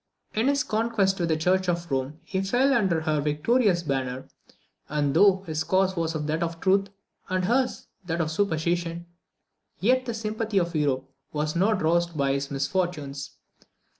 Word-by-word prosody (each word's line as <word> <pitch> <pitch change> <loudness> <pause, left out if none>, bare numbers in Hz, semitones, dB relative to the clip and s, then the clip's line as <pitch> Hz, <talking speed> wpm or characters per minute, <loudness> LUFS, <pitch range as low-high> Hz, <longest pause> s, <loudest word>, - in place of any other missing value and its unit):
In 220 +4 +1
his 285 +1 +2
contest 215 -5 +1
with 170 -1 0
the 160 - +2
Church 185 +3 +1
of 170 -2 -2
Rome, 135 +3 -2
he 190 - -2
fell 245 +8 +2
under 190 -10 +2
her 155 -2 0
victorious 175 - +2
banner; 130 -3 -2 0.6
and 145 -2 0
though 190 +3 +5
his 155 -1 -2
cause 190 0 +2
was 165 -1 -1
that 155 +1 -2
of 165 -1 -2
truth, 195 +2 +3 0.4
and 185 0 0
hers 250 +5 0 0.2
that 165 0 -1
of 155 -2 0
superstition, 170 -1 -1 0.7
yet 255 +5 +2
the 235 - -2
sympathy 220 -1 -2
of 170 -2 +1
Europe 135 -3 0 0.2
was 150 +1 -2
not 200 +1 +2
roused 170 0 +1
by 140 -1 +2
his 140 0 -2
misfortunes. 140 -1 -2
170 Hz, 165 wpm, -26 LUFS, 155-195 Hz, 0.7 s, though